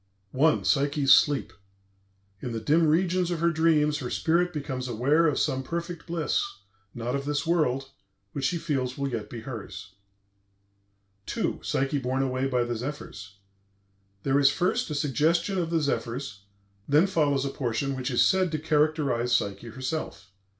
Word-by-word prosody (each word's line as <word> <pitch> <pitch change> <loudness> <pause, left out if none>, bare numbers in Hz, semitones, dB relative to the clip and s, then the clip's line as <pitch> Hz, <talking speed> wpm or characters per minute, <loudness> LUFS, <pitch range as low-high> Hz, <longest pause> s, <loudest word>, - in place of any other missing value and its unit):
PSYCHE'S 145 -1 +3
SLEEP 145 -1 +3 0.9
"In 125 - -4
the 115 - -2
dim 155 +8 +3
regions 180 +2 +2
of 175 -2 -2
her 170 +1 +2
dreams, 155 -2 +2
her 125 -4 -4
spirit 175 +5 +1
becomes 135 -5 -4
aware 140 +8 +2
of 145 - 0
some 130 - 0
perfect 170 +4 -5
bliss, 170 - 0 0.5
not 120 +2 -2
of 140 0 -3
this 145 +2 -1
world, 135 -5 0 0.4
which 135 +4 -3
she 170 +5 +1
feels 135 -6 -2
will 140 0 -1
yet 110 -4 -4
be 115 - -7
hers." 110 -5 -8 1.4
II. - - -1
PSYCHE 135 +1 -1
BORNE 130 +1 0
AWAY 130 0 -1
BY 125 -2 +1
THE 120 0 -3
ZEPHYRS 110 -6 -7 0.9
There 135 +1 +2
is 140 -1 +6
first 185 +10 0
a 150 - -3
suggestion 160 - +1
of 170 -2 -1
the 165 -1 +1
zephyrs; 120 -7 -3 0.4
then 150 +5 +5
follows 145 -7 +1
a - - -1
portion 135 +1 -2
which 130 0 -3
is 120 - +3
said 185 -3 +2
to - - +1
characterize 150 -5 +1
Psyche 100 0 -2
herself. 130 -4 -5
140 Hz, 155 wpm, -27 LUFS, 125-160 Hz, 1.4 s, is